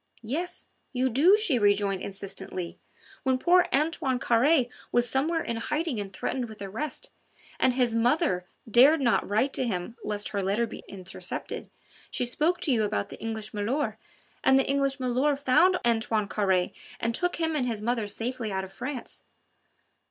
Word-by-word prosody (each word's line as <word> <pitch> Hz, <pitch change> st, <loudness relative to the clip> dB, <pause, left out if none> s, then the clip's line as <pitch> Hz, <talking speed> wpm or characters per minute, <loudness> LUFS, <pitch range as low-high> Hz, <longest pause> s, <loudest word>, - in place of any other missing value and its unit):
"Yes, 335 Hz, +10 st, -4 dB, 0.3 s
you 260 Hz, 0 st, +1 dB
do," 335 Hz, -, +6 dB
she 330 Hz, -, +1 dB
rejoined 200 Hz, -2 st, +2 dB
insistently. 195 Hz, -2 st, -6 dB, 0.4 s
"When 260 Hz, -1 st, +2 dB
poor 350 Hz, +6 st, +4 dB
Antoine 280 Hz, -3 st, +1 dB
Carre 255 Hz, +3 st, +3 dB, 0.2 s
was 240 Hz, 0 st, +3 dB
somewhere 305 Hz, +7 st, +1 dB
in 230 Hz, -, -3 dB
hiding 300 Hz, +1 st, -2 dB
and 200 Hz, -1 st, -5 dB
threatened 245 Hz, +4 st, -3 dB
with 220 Hz, -, -11 dB
arrest, 210 Hz, +10 st, -5 dB, 0.5 s
and 255 Hz, -, +3 dB
his 245 Hz, -2 st, +2 dB
mother 230 Hz, -, +1 dB, 0.2 s
dared 265 Hz, +8 st, +6 dB
not 240 Hz, -7 st, +2 dB
write 230 Hz, +7 st, +1 dB
to -, -, +1 dB
him 195 Hz, +2 st, -3 dB
lest 205 Hz, -1 st, -2 dB
her 200 Hz, -, -2 dB
letter 200 Hz, +5 st, +1 dB
be -, -, -9 dB
intercepted, 190 Hz, -2 st, -5 dB, 0.4 s
she 250 Hz, -, 0 dB
spoke 310 Hz, +8 st, +1 dB
to 300 Hz, -, +1 dB
you 235 Hz, -3 st, +3 dB
about 200 Hz, -, -1 dB
the -, -, -10 dB
English 220 Hz, -1 st, -4 dB
milor', 230 Hz, +8 st, -1 dB, 0.4 s
and 265 Hz, 0 st, +6 dB
the 270 Hz, -, +3 dB
English 275 Hz, 0 st, +1 dB
milor' 260 Hz, +3 st, +1 dB
found 290 Hz, +7 st, +4 dB
Antoine 225 Hz, -2 st, +1 dB
Carre 190 Hz, -3 st, +1 dB, 0.3 s
and 230 Hz, 0 st, 0 dB
took 355 Hz, +8 st, 0 dB
him 320 Hz, -1 st, -1 dB
and 260 Hz, -4 st, 0 dB
his 220 Hz, -3 st, -2 dB
mother 230 Hz, -2 st, 0 dB
safely 230 Hz, +2 st, -3 dB
out 190 Hz, 0 st, -1 dB
of 190 Hz, -, -9 dB
France. 255 Hz, 0 st, -6 dB
240 Hz, 165 wpm, -27 LUFS, 210-280 Hz, 0.5 s, do